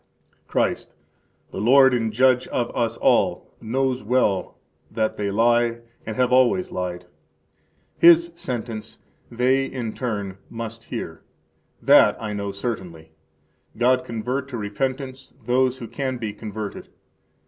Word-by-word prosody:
Christ, - - -1 0.6
the - - -5
Lord 130 +3 +6
and 115 -3 0
Judge 130 +2 +3
of 120 -1 -2
us 115 -1 0
all, - - +1
knows 130 +2 -1
well 105 -4 0 0.3
that 110 -1 -1
they 100 -1 -2
lie 115 +2 +2 0.3
and 110 - -4
have 125 +1 +1
[always] 130 +9 +3
lied, 90 -1 -4 0.9
His 170 0 +7
sentence 120 -8 -5 0.3
they 125 +3 +2
in 120 -5 -4
turn, 100 -6 -4
must 115 0 -7
hear; - - -6 0.6
that - - +6
I 105 -2 -4
know 100 -1 -3
certainly. 90 -7 -6 0.7
God 125 +2 +3
convert 125 +3 -3
to 130 -3 -6
repentance 130 +5 -4
those 130 +1 +2
who 120 -3 -7
can 130 +2 -3
be 110 -3 -4
converted! 105 0 -7
120 Hz, 125 wpm, -23 LUFS, 110-130 Hz, 0.9 s, His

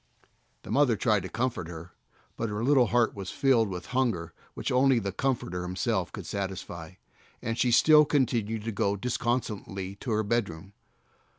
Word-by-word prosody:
The - - -8
mother 135 -5 +4
tried 105 -1 +2
to - - -6
comfort 120 -7 -2
her, 85 +1 -9 0.4
but 115 - -2
her 105 +2 -3
little 130 -2 +4
heart 120 +1 +2
was 100 -3 -6
filled 120 -6 +2
with 90 -2 -6
hunger 115 -11 0 0.2
which - - -3
only 130 0 +4
the 100 -4 -1
Comforter 95 -6 -2
Himself 90 +1 -1
could 100 -5 -8
satisfy, 95 -4 -5 0.5
and 115 - -3
she 125 +1 +2
still 150 +5 +7
continued 115 -7 0
to 115 - -3
go 100 -1 0
disconsolately 105 -4 -2
to 125 - -7
her 110 -1 +1
bedroom. 100 -4 -2
110 Hz, 165 wpm, -28 LUFS, 95-125 Hz, 0.5 s, still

